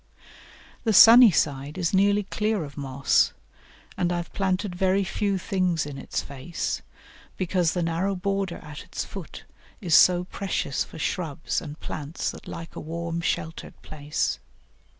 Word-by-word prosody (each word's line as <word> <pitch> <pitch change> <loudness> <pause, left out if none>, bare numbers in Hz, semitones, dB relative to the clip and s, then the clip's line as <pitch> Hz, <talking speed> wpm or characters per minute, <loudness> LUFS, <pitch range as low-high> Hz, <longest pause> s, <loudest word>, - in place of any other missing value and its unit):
The 220 - +1
sunny 230 +4 +10
side 145 -3 -1
is 180 -1 -1
nearly 200 +2 +3
clear 210 -1 -1
of 145 -1 -9
moss, 140 -1 +1 0.6
and 175 -1 0
I 175 - 0
have 170 -1 -6
planted 190 0 -1
very 190 +2 +2
few 200 +1 -1
things 180 -4 0
in 140 -2 -7
its - - -3
face, 140 +4 -4 0.6
because 180 -2 +1
the 175 - -1
narrow 170 +4 0
border 195 -1 -2
at 150 -1 -9
its - - -5
foot - - -9 0.4
is 180 -7 -2
so 180 +3 +6
precious 185 -6 -2
for - - -12
shrubs 160 -2 -2
and 150 -1 -8
plants 150 +1 -4
that - - -12
like 165 0 -8
a - - -5
warm, 170 +1 -4
sheltered 160 -1 -3
place. 150 -1 -2
175 Hz, 150 wpm, -25 LUFS, 155-195 Hz, 0.6 s, sunny